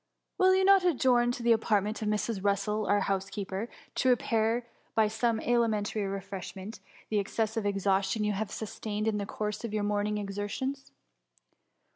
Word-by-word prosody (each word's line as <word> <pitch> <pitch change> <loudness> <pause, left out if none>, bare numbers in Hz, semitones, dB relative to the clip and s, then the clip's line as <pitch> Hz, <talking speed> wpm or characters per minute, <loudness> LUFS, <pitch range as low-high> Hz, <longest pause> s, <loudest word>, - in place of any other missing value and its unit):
Will 375 0 +6
you 380 0 +3
not 390 -1 +6
adjourn 250 -8 +3
to 245 - -6
the 235 - +4
apart 220 -3 +3
ment 215 +2 -4
of 215 - -1
Mrs. 210 0 0
Russel^ 205 +1 0
our 205 0 +4
housekeeper, 195 +2 -2 0.2
to 260 - +2
re 250 - +7
pair 230 +1 0 0.3
by 220 -1 +4
some 225 +1 0
alimentary 215 -3 +1
refreshment, 195 +1 -6 0.3
the 210 - +3
ex* 200 - -5
cessive 225 -1 0
exhaustion 195 +1 +1
you 210 0 +1
have 205 +1 -2
sustained 215 0 -4
in 210 -1 +1
the 200 - -3
course 210 0 -3
of 220 -2 -3
your 210 - 0
morning^s 205 0 0
exertions 205 +7 -4
210 Hz, 170 wpm, -30 LUFS, 200-230 Hz, 0.3 s, re